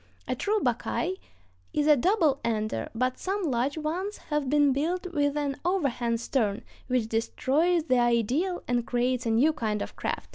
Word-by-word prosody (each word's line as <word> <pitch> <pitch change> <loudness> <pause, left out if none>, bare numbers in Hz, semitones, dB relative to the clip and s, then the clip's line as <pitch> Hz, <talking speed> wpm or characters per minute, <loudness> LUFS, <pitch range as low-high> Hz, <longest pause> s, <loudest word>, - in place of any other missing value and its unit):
A - - 0
true 425 +1 0
buckeye 360 -2 -1 0.6
is 295 - +1
a 300 -1 +7
double 315 - +2
ender, 215 - -1
but 255 +2 0
some 395 +1 -2
large 270 -1 0
ones 355 +7 -3
have 295 -3 0
been 290 -1 +4
built 340 +7 -1
with 285 -1 +1
an 285 -2 -1
overhang 260 -10 0
stern, 225 -3 -1 0.2
which 250 -3 +1
destroys 295 +9 +1
the 255 -5 +2
ideal 240 - +1
and 245 -1 0
creates 250 0 0
a - - +1
new 255 +8 +4
kind 220 -7 -2
of - - -6
craft. - - -4
275 Hz, 170 wpm, -27 LUFS, 240-320 Hz, 0.6 s, a